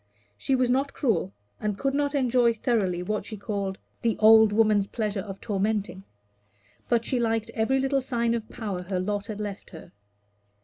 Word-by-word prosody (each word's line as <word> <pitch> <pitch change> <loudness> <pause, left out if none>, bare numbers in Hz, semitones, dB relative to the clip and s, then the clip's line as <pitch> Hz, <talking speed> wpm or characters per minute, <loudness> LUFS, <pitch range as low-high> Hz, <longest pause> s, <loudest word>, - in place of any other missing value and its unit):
She 265 - 0
was 250 -1 +2
not 275 +2 0
cruel, 215 - 0 0.3
and 210 -2 -2
could 275 +3 -1
not 285 0 0
enjoy 245 -3 +3
thoroughly 200 -7 0
what 210 +3 -2
she 215 - -7
called 200 -2 -3 0.2
the 230 -2 0
old 220 0 +7
woman's 210 -2 +3
pleasure 210 -3 -2
of 195 0 -7
tormenting; 200 -2 -2 0.8
but 235 -1 +2
she 255 - 0
liked 225 -1 0
every 245 +4 +1
little 270 +1 +1
sign 235 -2 0
of 225 -2 -4
power 200 -5 -4
her 185 0 -3
lot 205 +2 -2
had 215 -2 -6
left 205 -1 -6
her. 160 - -12
220 Hz, 175 wpm, -26 LUFS, 200-240 Hz, 0.8 s, old